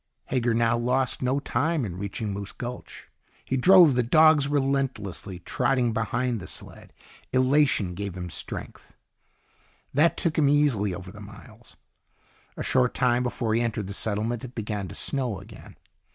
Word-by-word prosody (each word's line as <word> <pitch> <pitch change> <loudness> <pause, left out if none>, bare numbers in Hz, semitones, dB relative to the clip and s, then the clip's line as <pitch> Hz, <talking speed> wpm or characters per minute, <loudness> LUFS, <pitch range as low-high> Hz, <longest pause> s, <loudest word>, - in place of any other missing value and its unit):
Hager 120 -3 +1
now 115 0 +2
lost 125 +2 0
no 130 +2 +1
time 145 +2 -1
in 90 -4 -6
reaching 100 +1 -4
Moose 100 0 -6
Gulch. 125 0 -8 0.4
He 135 - -1
drove 175 +2 +7
the 125 - +2
dogs 150 +3 +5
relentlessly, 135 -10 -2
trotting 120 +4 0
behind 115 +2 -1
the 90 - -9
sled. - - -9 0.4
Elation 130 -7 +2
gave 95 0 -5
him 90 - -4
a 90 - -8
strength - - -6 1.0
that 155 +5 +3
took 160 -2 0
him 145 -2 +4
easily 125 -10 +2
over 95 -2 -9
the 105 +1 -12
miles. 110 +3 -14 0.8
A - - -3
short 125 -1 +2
time 125 -1 +2
before 120 -2 -1
he 115 - +2
entered 110 -3 -2
the 100 - -6
settlement 110 +3 -2
it 125 -1 -9
began 105 -3 -4
to - - -9
snow 125 -8 -2
again. 105 +3 -13
120 Hz, 160 wpm, -26 LUFS, 105-135 Hz, 1.0 s, drove